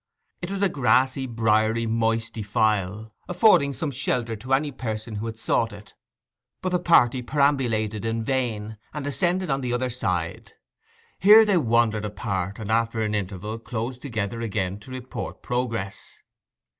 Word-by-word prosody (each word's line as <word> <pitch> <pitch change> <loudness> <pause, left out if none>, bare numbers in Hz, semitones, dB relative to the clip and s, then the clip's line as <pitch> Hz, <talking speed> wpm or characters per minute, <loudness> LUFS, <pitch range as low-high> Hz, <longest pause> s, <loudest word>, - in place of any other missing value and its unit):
It 175 - -4
was 200 0 -2
a - - +5
grassy, 130 -3 +2
briery, 110 0 +2
moist 115 0 0
defile, 105 0 -1 0.2
affording 180 -6 +5
some 140 +3 -3
shelter 120 -3 -1
to 125 +5 -9
any 145 +2 -1
person 110 -4 -5
who 110 +3 -3
had 110 0 -6
sought 115 0 0
it; 105 0 -13 0.7
but 185 - 0
the 180 -1 +1
party 130 -8 +4
perambulated 120 -6 +1
it 115 - -1
in 115 0 -2
vain, 110 -4 -2 0.2
and 150 -2 -4
ascended 175 +5 0
on 135 0 0
the 125 -2 -2
other 125 +1 -1
side. 90 -9 -3 0.7
Here 215 +3 +8
they 205 -3 +3
wandered 115 -6 +2
apart, 100 -1 -3
and 110 -1 -5
after 115 0 +1
an 105 -1 -1
interval 105 +2 -3
closed 120 +2 -5
together 115 -4 -3
again 100 -3 -2
to 105 - -14
report 130 0 -6
progress. 115 -6 -3
115 Hz, 155 wpm, -25 LUFS, 110-130 Hz, 0.7 s, Here